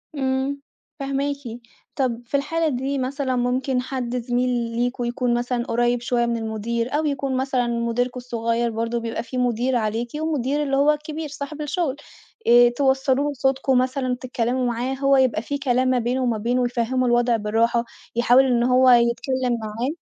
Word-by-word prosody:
امم 270 +1 -1 0.4
فهماكِ، 275 +1 -1 0.6
طَب 245 -4 -1
في 280 +4 0
الحالة 325 +3 0
دي 270 +2 -2
مثلًا 260 0 -2
ممكن 250 +1 0
حد 250 -1 -3
زميل 245 +1 0
ليكم 240 +1 -1
يكون 240 0 0
مثلًا 240 0 -1
قريب 240 0 +1
شوية 240 0 +1
من 235 0 -1
المدير، 230 +2 -3
أو 310 +1 +1
يكون 275 -2 -1
مثلًا 260 -2 0
مديركم 235 +1 -1
الصغير 235 -1 -1
برضه 230 +1 -2
بيبقى 230 0 -4
في 255 - -6
مدير 250 +1 +1
عليكِ، 225 +1 -1
ومدير 295 -2 0
اللي 275 -2 0
هو 285 +2 +5
الكبير 300 +1 -4
صاحب 295 +1 -6
الشغل، 300 -2 -1 0.5
آآ، 240 0 +7
توصلوا 265 +2 +1
له 290 - -2
صوتكم 265 0 +1
مثلًا، 255 0 0
تتكلموا 250 0 -1
معاه 245 +2 -1
هو 275 0 +3
يبقى 255 -5 +2
في 285 +4 -3
كلام 255 -2 +1
ما 255 -1 +2
بينه 250 +3 -1
وما 235 -3 0
بينه 245 +3 0
يفهموا 245 +1 0
الوضع 240 0 +3
بالراحة 230 +3 +1 0.3
يحاول 245 +3 +5
إنه 245 0 +2
هو 255 0 +6
يتكلم 245 +1 +2
معاه. 220 +4 -3
250 Hz, 170 wpm, -23 LUFS, 235-270 Hz, 0.6 s, آآ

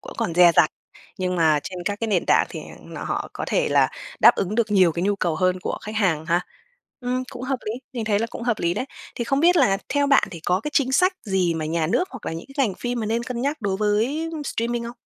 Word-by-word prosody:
cũng - - -9
còn 165 - -2
dè 175 -1 +7
dặt. 155 - +5 0.5
Nhưng 180 -1 -1
mà 155 -3 +3
trên 185 - -7
các 205 +2 -2
cái 230 - -1
nền 190 -5 +1
tảng - - +4
thì - - -6 0.2
nọ - - -7
họ - - -3
có - - -4
thể - - +1
là - - +4 0.3
đáp - - +8
ứng 195 +2 -2
được 230 -2 +1
nhiều 185 -5 +5
cái 170 - -3
nhu 200 +1 +1
cầu 170 -5 -1
hơn 185 +1 +1
của - - -3
khách 215 - -6
hàng 165 -7 +1
ha. 175 +1 +2 0.6
Ừm, 250 0 -1
cũng 245 - -8
hợp 265 0 -1
lý, 215 - -1 0.2
mình 235 -3 -3
thấy 205 -2 +2
là 230 - -1
cũng - - -7
hợp 235 -3 0
lý 170 +1 0
đấy. 255 - -2 0.3
Thì 235 - -3
không 275 +3 +1
biết 350 +2 +5
là 210 -10 +4
theo 285 0 +1
bạn 275 -1 +4
thì 170 -4 -8
có 180 +4 +1
cái 300 - -4
chính 265 -2 +2
sách 365 +6 +4
gì 185 -4 +1
mà 160 - -3
nhà 160 0 0
nước 360 - +1
hoặc 255 - -10
là - - -2
những 165 - -7
cái 270 -3 +3
ngành 190 - -4
phim 245 -1 -3
mà 215 - -2
nên 230 +2 0
cân 240 -1 -4
nhắc 285 +1 -1
đối 195 -2 -1
với 225 +11 0
streaming 235 -2 -2
không? 240 +1 -7
210 Hz, 275 wpm, -23 LUFS, 180-250 Hz, 0.6 s, đáp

